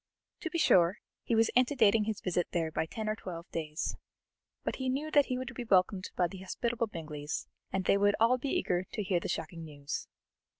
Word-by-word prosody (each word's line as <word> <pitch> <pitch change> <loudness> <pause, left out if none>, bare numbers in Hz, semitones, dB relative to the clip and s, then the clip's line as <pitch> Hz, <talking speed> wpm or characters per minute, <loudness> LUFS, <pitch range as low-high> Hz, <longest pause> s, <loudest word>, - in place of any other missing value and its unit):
To 330 - -3
be 335 - -2
sure, 185 - +5 0.2
he 230 - 0
was 225 0 +4
antedating 240 -4 +4
his 220 -2 -3
visit 175 -2 0
there 165 -2 0
by 160 - -1
ten 220 +5 -4
or 215 - +1
twelve 175 -5 -7
days; 155 -1 -2 0.7
but - - -2
he 260 -1 -1
knew 290 +4 -1
that 290 -2 +5
he 255 - -1
would 255 -1 -5
be 245 - -4
welcomed 190 -2 +2
by 180 - +3
the 190 +2 -9
hospitable 230 +5 -1
Bingleys, 155 -5 -5 0.3
and 190 -1 -1
they - - +4
would 205 0 +4
all 240 +3 +4
be 275 - -2
eager 180 -7 +1
to 210 - -1
hear 185 -2 +1
the - - -5
shocking 165 +1 -4
news. 145 -2 -5
200 Hz, 210 wpm, -31 LUFS, 170-240 Hz, 0.7 s, sure